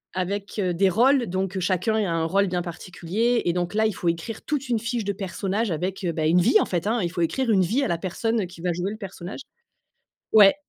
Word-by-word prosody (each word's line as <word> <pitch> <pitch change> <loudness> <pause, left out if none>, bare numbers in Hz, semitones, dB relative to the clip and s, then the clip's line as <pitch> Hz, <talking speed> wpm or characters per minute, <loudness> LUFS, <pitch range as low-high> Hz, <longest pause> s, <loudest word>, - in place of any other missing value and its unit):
avec, 200 +3 -3
heu, 185 -3 0
des 190 +2 +3
rôles, 245 +4 +3
donc 190 +1 -2
heu, - - -1
chacun 185 +4 0
a 210 -5 +1
un 165 -1 0
rôle 195 +3 +2
bien 180 -1 -1
particulier 190 +7 -1
et 170 - +2
donc 180 +3 -2
là 220 0 +3
il 215 - +1
faut 175 - -4
écrire 170 +7 -4
toute 280 -3 -2
une 235 -3 +1
fiche 230 0 -2
de 200 - -1
personnages 195 +3 -2
avec, 185 +4 -3
heu, 170 - 0
bah 155 -1 -1
une 175 +3 +4
vie 430 - +5
en - - +2
fait 180 +2 -2
hein! 230 +2 +1
Il 170 - -1
faut 175 -2 -3
écrire 235 +8 +1
une 190 -3 +4
vie 235 +11 +1
à - - +1
la 170 -1 -1
personne 215 +2 -1
qui 170 -2 -13
va 175 -1 0
jouer 180 +3 -2
le 215 - -6
personnage. 195 +1 -7 0.9
Ouais 210 +1 +7
195 Hz, 255 wpm, -24 LUFS, 175-220 Hz, 0.9 s, Ouais